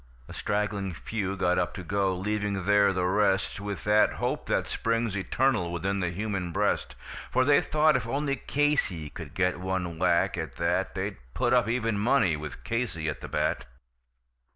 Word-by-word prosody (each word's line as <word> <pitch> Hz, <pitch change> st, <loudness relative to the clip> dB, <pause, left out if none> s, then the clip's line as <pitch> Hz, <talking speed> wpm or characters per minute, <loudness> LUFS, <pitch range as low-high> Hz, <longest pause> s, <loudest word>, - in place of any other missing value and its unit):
A -, -, -9 dB
straggling 105 Hz, -3 st, -2 dB
few 100 Hz, -1 st, -3 dB
got 90 Hz, -1 st, +2 dB
up 90 Hz, -, -1 dB
to 95 Hz, -, -6 dB
go, 95 Hz, +1 st, 0 dB
leaving 105 Hz, 0 st, -1 dB
there 100 Hz, 0 st, +5 dB
the 90 Hz, -1 st, 0 dB
rest 95 Hz, 0 st, +1 dB
With 100 Hz, -1 st, -5 dB
that 105 Hz, +1 st, +4 dB
hope -, -, -2 dB
that -, -, +1 dB
springs 115 Hz, -2 st, -1 dB
eternal 100 Hz, -1 st, +1 dB
within 95 Hz, +3 st, -1 dB
the 90 Hz, -2 st, 0 dB
human 95 Hz, -1 st, -3 dB
breast; 65 Hz, -5 st, 0 dB, 0.3 s
For 130 Hz, -, +2 dB
they 145 Hz, +1 st, +5 dB
thought 155 Hz, 0 st, +3 dB
if 120 Hz, -2 st, -1 dB
only 140 Hz, +3 st, 0 dB
Casey 135 Hz, -, 0 dB
could 80 Hz, -5 st, -9 dB
get 90 Hz, -1 st, +1 dB
one 90 Hz, -3 st, -3 dB
whack, 85 Hz, -1 st, +2 dB
at -, -, -5 dB
that -, -, 0 dB
They'd -, -, -3 dB, 0.2 s
put -, -, +2 dB
up -, -, +4 dB
even 115 Hz, -3 st, 0 dB
money, 105 Hz, -, +3 dB
with 75 Hz, -2 st, -8 dB
Casey 115 Hz, -9 st, -2 dB
at 70 Hz, -3 st, -5 dB
the -, -, -6 dB
bat. -, -, -1 dB
100 Hz, 175 wpm, -28 LUFS, 90-115 Hz, 0.3 s, there